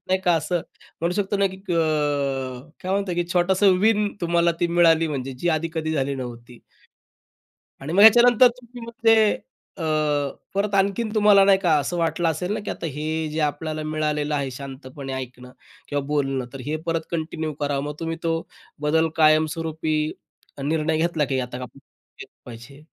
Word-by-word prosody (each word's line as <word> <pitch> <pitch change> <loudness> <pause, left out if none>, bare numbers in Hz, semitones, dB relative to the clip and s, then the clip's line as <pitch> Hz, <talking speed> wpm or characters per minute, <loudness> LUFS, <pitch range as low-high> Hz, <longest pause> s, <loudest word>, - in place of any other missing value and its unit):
नाही 185 0 +1
का 175 - +4
असं 165 +2 -1 0.4
म्हणू 170 +2 0
शकतो 205 0 -1
ना 200 - +3
की 190 0 -6
अ, 185 -3 -2 1.0
काय 185 +1 -2
म्हणतात 195 -2 -1
की 175 0 0
छोटासा 185 +3 +2
विन 210 -1 +3
तुम्हाला 170 0 +2
ती 175 - +3
मिळाली 165 -1 +4
म्हणजे 135 -3 -4
जी 175 - -1
आधी 165 +1 -3
कधी 160 0 -2
झाली 140 -2 -1
नव्हती. 120 -2 -8 1.2
आणि 155 +5 -5
मग 200 - +5
याच्यानंतर 240 +2 +8
तुम्ही 245 0 -10
मग 235 - -8
ते 225 - +7 0.6
अ, 175 - -7 0.7
परत 200 0 0
आणखीन 200 +3 +1
तुम्हाला 205 -2 +6
नाही 195 -1 +5
का 175 -5 +1
असं 160 +6 -3
वाटलं 165 0 0
असेल 180 +4 -3
ना - - -2
की 210 - -7
आता 170 - -6
हे 150 +1 -4 0.3
जे 155 - -3
आपल्याला 155 +1 -2
मिळालेलं 150 -1 -1
आहे 140 -2 -2
शांतपणे 135 +1 -8
ऐकणं 125 -1 -7 0.4
किंवा 145 -1 -2
बोलणं. 135 -3 -1
तर 135 - -7
हे 150 +2 -2
परत 165 -1 0
कंटिन्यू 160 -1 -3
करावं 145 -1 -1
मग 150 0 -4
तुम्ही 165 0 -3
तो 165 0 +1 0.5
बदल 160 +2 +2
कायमस्वरूपी 155 0 +2 0.7
निर्णय 155 +2 0
घेतला 160 -2 +1
की 135 -1 -1
आता 125 -1 -5
काय 125 - -5
केलं - - -17
पाहिजे? 120 +4 -12
160 Hz, 170 wpm, -23 LUFS, 145-185 Hz, 1.2 s, याच्यानंतर